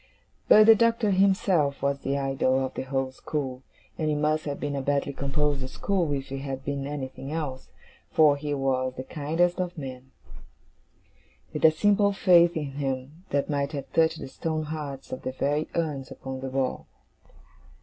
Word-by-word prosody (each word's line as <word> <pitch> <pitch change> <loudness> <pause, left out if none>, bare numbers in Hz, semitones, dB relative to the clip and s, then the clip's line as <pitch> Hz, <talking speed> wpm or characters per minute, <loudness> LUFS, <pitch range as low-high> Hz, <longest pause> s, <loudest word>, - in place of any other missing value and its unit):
But 215 0 +8
the 225 - +10
Doctor 230 -1 +2
himself 185 -7 +2
was 140 0 +1
the 140 +1 -1
idol 135 -1 +1
of 130 - -6
the - - -4
whole 135 0 -2
school: 130 -2 -4 0.4
and 155 -1 0
it 150 - +1
must 155 +1 0
have 145 -1 -3
been 145 -1 -2
a 140 - -1
badly 140 +1 0
composed 140 0 -1
school 180 0 -1
if 135 -1 -4
he 135 0 -4
had 135 -1 -5
been 140 -1 -3
anything 135 -1 -6
else, 150 -5 -4 0.4
for 150 -2 +5
he 145 +1 -5
was 130 -2 0
the 130 - -5
kindest 165 +6 0
of 175 -1 -4
men; 130 -2 -7 1.4
with - - -4
a 160 - +9
simple 200 +5 +3
faith 175 -3 +5
in 145 -3 -3
him 140 +5 -4
that 140 0 0
might 140 0 -1
have 140 -2 -6
touched 160 0 +3
the - - -7
stone 155 +3 -3
hearts 150 -3 -6
of 130 - -5
the 130 - -4
very 145 +3 0
urns 150 -6 -2
upon 130 0 -7
the 135 0 -4
wall. 130 -1 -2
145 Hz, 180 wpm, -26 LUFS, 135-160 Hz, 1.4 s, the